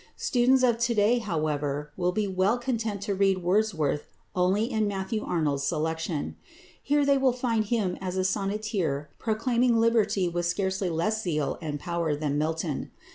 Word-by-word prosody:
Students 255 +1 +3
of 240 -2 +3
to 235 0 +1
day, 215 +4 +4
however, 150 -7 -2
will 180 -1 0
be 210 +2 -1
well 190 +4 +2
content 225 -5 -2
to 200 - -1
read 195 -1 +2
Wordsworth 175 -7 +1 0.3
only 185 +4 +2
in 220 -3 0
Matthew 200 +2 -2
Arnold's 150 -5 0
"Selections." 160 0 -2 0.5
Here 290 +1 +2
they 280 -1 +4
will 265 -2 +3
find 235 -3 0
him 205 -5 -1
as 185 -1 -3
a 185 - +1
sonneteer 195 -7 -1
proclaiming 235 +2 +1
liberty 225 -5 +2
with 175 0 -1
scarcely 190 +1 -1
less 175 +7 0
zeal 155 -7 -1
and 150 -2 -4
power 170 -2 -1
than 145 -1 -1
Milton. 160 -1 -2
195 Hz, 160 wpm, -27 LUFS, 165-225 Hz, 0.5 s, day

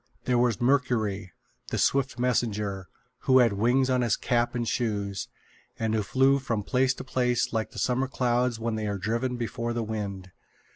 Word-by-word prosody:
There 125 -1 +2
was 120 -4 +2
Mercury, 115 -7 +1 0.4
the - - -3
swift 135 -2 +1
messenger, 105 -6 -1 0.4
who 130 - +5
had 120 -4 +5
wings 120 +6 +2
on 130 -1 +2
his 120 -3 +1
cap 120 0 0
and 120 -1 -1
shoes, 100 -7 -2 0.5
and 110 -1 -1
who 110 - +2
flew 135 +6 +3
from 115 -6 -2
place 130 +3 +1
to - - -7
place 125 -3 0
like 110 -1 -1
the - - -14
summer 130 +1 +1
clouds 125 -2 0
when 115 0 -2
they 110 -1 -2
are 100 -1 -2
driven 115 +6 -1
before 120 0 -3
the 115 -1 -1
wind. 100 -4 -5
120 Hz, 180 wpm, -27 LUFS, 105-125 Hz, 0.5 s, who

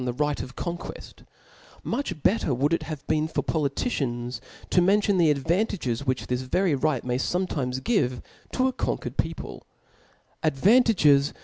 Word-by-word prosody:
he - - -3
li^c 145 +1 -1
of 125 +2 -8
ccmqiiieft, 175 0 -7 0.6
mucH 235 - -3
better 180 - +2
would 145 +6 +1
it - - +1
have 155 -3 -7
been^^for 155 +1 0
politicians' 135 - -2 0.3
to 180 - +5
miin^ 200 +4 +4
tion 200 -3 +2
the 165 -3 +5
advantages 145 - 0
Which 130 0 0
this 125 0 -1
ydrjr 145 +2 0
right 155 -5 +1
may 125 0 -1
iboietittes 135 -8 -1
give 130 - +1 0.3
to 260 0 +2
a 260 - -1
coiiq^ered - - -3
peopk; - - -3 0.8
advantajgeji. 155 - +4
150 Hz, 145 wpm, -26 LUFS, 130-185 Hz, 0.8 s, to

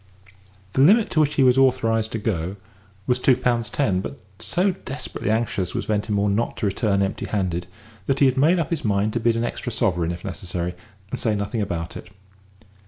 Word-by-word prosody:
The 130 - +2
limit 205 - +5
to 155 - +2
which 150 -1 +2
he 135 - +4
was 130 0 +5
authorised 115 -4 +2
to - - -1
go 95 -4 -2 0.5
was 125 0 +1
two 125 0 +4
pounds 120 -3 0
ten; 100 -10 +1
but, 140 - -7 0.2
so 185 +3 +1
desperately 145 - -5
anxious 110 -5 -1
was - - -2
Ventimore 105 -1 0
not 105 +4 0
to - - -2
return 100 0 +1
empty 95 - -3
handed, 90 -4 -2 0.4
that 135 - +1
he 140 - +5
had 130 -1 +3
made 155 +7 +4
up 165 -1 -1
his 165 - -1
mind 105 0 +1
to 120 - 0
bid 115 0 +2
an 115 - 0
extra 120 +1 -3
sovereign 90 -6 0
if 85 +2 -7
necessary, 90 -2 -3 0.4
and - - -3
say 110 -3 +1
nothing 100 +2 -2
about 85 -4 -3
it. 90 - -9
110 Hz, 200 wpm, -23 LUFS, 100-130 Hz, 0.5 s, limit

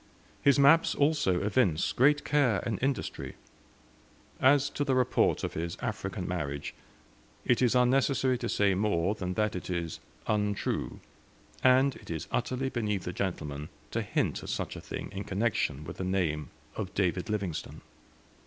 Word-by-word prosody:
His 140 0 +5
maps 140 +4 +5
also 145 - +2
evince 100 -6 +2
great 145 +4 +3
care 135 -8 +2
and 110 -4 -2
industry. 135 0 -2 1.0
As 140 +1 +5
to 145 - -1
the 135 -2 +1
report 125 -1 +2
of - - -2
his 85 +1 -4
African 100 -4 -4
marriage, 75 -5 -3 0.7
it 120 - +3
is 125 0 +3
unnecessary 130 +1 +3
to 120 - -3
say 100 -1 +3
more 95 -1 +1
than 90 -4 -4
that 105 -2 0
it 90 - -5
is 85 -3 -3 0.3
untrue, 105 -1 -1 0.6
and 130 +1 +5
it - - -15
is 80 -3 -4
utterly 130 +1 -1
beneath 105 -7 -2
a 90 - -3
gentleman 75 -6 -3 0.2
to - - -1
hint - - -1
at - - -8
such - - -3
a - - -7
thing - - -6
in 100 0 -5
connection 100 - -1
with - - -8
the - - -3
name 85 -6 -1 0.3
of 100 -4 -4
David 95 0 0
Livingstone. 100 -7 -3
105 Hz, 155 wpm, -29 LUFS, 90-130 Hz, 1.0 s, His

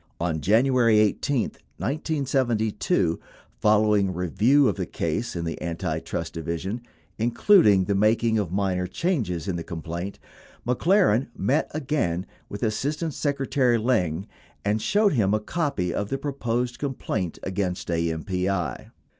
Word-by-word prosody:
On 80 -2 -1
January 115 - +4
18, 110 +4 +1 0.3
1972, 125 - 0 0.4
following 105 -2 +3
review 110 - +3
of - - +1
the 90 -3 -3
case 85 +9 -2
in 85 -1 -3
the 80 - -4
Antitrust 80 0 -3
Division, 85 +7 -4 0.4
including 115 - +5
the 100 - 0
making 110 +2 +3
of 95 -5 -2
minor 95 -2 0
changes 100 - -1
in 90 -3 -1
the 85 - -4
complaint, 85 +4 -5 0.5
McLaren 135 - +3
met 130 +10 +1
again 130 - -1 0.2
with 100 - -6
Assistant 145 +8 -1
Secretary 135 -4 +1
Lyng 100 -7 0 0.4
and 105 +2 +1
showed 205 - +3
him 105 -5 +2
a - - +1
copy 125 - -2
of 100 - -2
the 135 - -1
proposed 125 -3 -2
complaint 110 - -3
against 95 -2 -2
AMPI. 85 0 -1
105 Hz, 125 wpm, -25 LUFS, 90-130 Hz, 0.5 s, including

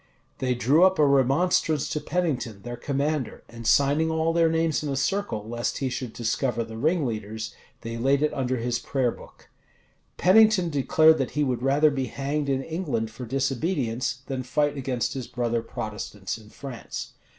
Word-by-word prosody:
They 125 -1 0
drew 140 +8 +4
up 190 0 +5
a 150 - +5
remonstrance 145 +4 +2
to 150 - -2
Pennington, 135 - -2
their 120 0 -5
commander, 140 +1 -2
and 115 -1 -7
signing 145 +3 +3
all 160 +1 +1
their 165 -1 +4
names 160 -1 +1
in 150 - -3
a 135 - -1
circle, 135 - -1
lest 120 +1 -2
he 135 -2 -1
should 125 -1 -4
discover 120 +1 -1
the 110 0 -9
ringleaders, 110 - -1 0.3
they 115 0 -5
laid 135 +4 +2
it 150 - +1
under 130 -1 -1
his 120 +1 -1
prayer 130 -2 0
book. - - -15 0.7
Pennington 195 -2 +5
declared 155 +2 +4
that 135 - -1
he 150 - +3
would 125 -4 -1
rather 145 +3 +4
be 135 -2 -2
hanged 140 +3 -2
in 135 -1 0
England 155 -10 -2
for 125 +3 -7
disobedience, 130 -1 -1
than 135 -2 -3
fight 145 +3 0
against 130 -3 -2
his 130 -3 -5
brother 120 -1 -1
Protestants 105 -3 -5
in 110 -2 -13
France. 130 -2 -7
135 Hz, 175 wpm, -26 LUFS, 120-155 Hz, 0.7 s, up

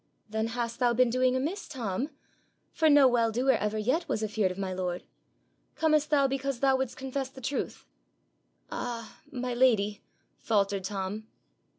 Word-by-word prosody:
'Then 220 0 0
hast 235 0 -3
thou 245 -2 +3
been 250 0 +3
doing 255 +1 +2
amiss, 310 +10 -2
Tom? 245 0 -3 0.6
for 320 -2 +3
no 285 -2 +7
well 235 -2 +3
doer 250 +4 +3
ever 210 -3 0
yet 255 +11 0
was 220 - 0
afeard 210 -2 +1
of 180 - -6
my 190 -1 -2
lord. 180 -1 -3 0.7
Comest 305 -1 +2
thou 285 -2 +4
because 270 -1 -1
thou 270 0 +4
wouldst 260 -2 -2
confess 265 0 -3
the 265 - -12
truth?' 265 +2 -3 0.9
'Ah, 230 -2 -5
my 250 -1 -3
lady,' 220 -5 +3 0.4
faltered 200 -3 +1
Tom. 200 +2 -4
245 Hz, 160 wpm, -29 LUFS, 215-265 Hz, 0.9 s, no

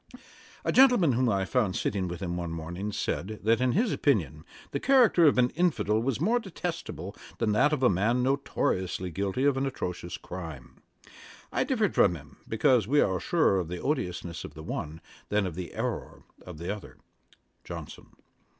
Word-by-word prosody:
' - - -23
A - - +2
gentleman, 250 - +6
whom 125 0 +2
I 95 -2 +1
found 105 -4 0
sitting 100 -5 -1
with 85 +1 -6
him 85 -1 -2
one 85 -1 -3
morning, 85 +5 -5
said, 105 +1 -3
that 115 +2 +3
in 130 -1 +2
his 225 +3 +2
opinion 80 - 0 0.3
the 140 - -2
character 240 - +5
of 145 - +4
an 125 0 +3
infidel 150 - +1
was 130 0 -1
more 225 +10 +2
detestable 165 - -5 0.2
than 115 -2 +1
that 130 +9 +4
of 145 -4 -1
a - - +7
man 115 +7 +1
notoriously 95 -9 -1
guilty 100 - -1
of 140 -2 +3
an 135 +1 0
atrocious 90 -9 -4
crime. 80 -9 -9 0.7
I - - +2
differed - - 0
from 85 - +4
him, 75 -3 -13
because 110 -1 +3
we 145 +4 +3
are 95 -7 +2
surer 155 - +2
of 90 - -3
the 90 +1 -5
odiousness 90 - -3
of 75 - -9
the 80 - -9
one, 80 +1 -5 0.3
than 105 -1 +1
of 90 - -3
the 90 +1 -7
errour - - -4 0.2
of 90 -3 -9
the 85 +6 -3
other. 105 - -12 0.7
JOHNSON. - - -8
105 Hz, 185 wpm, -28 LUFS, 90-135 Hz, 0.7 s, a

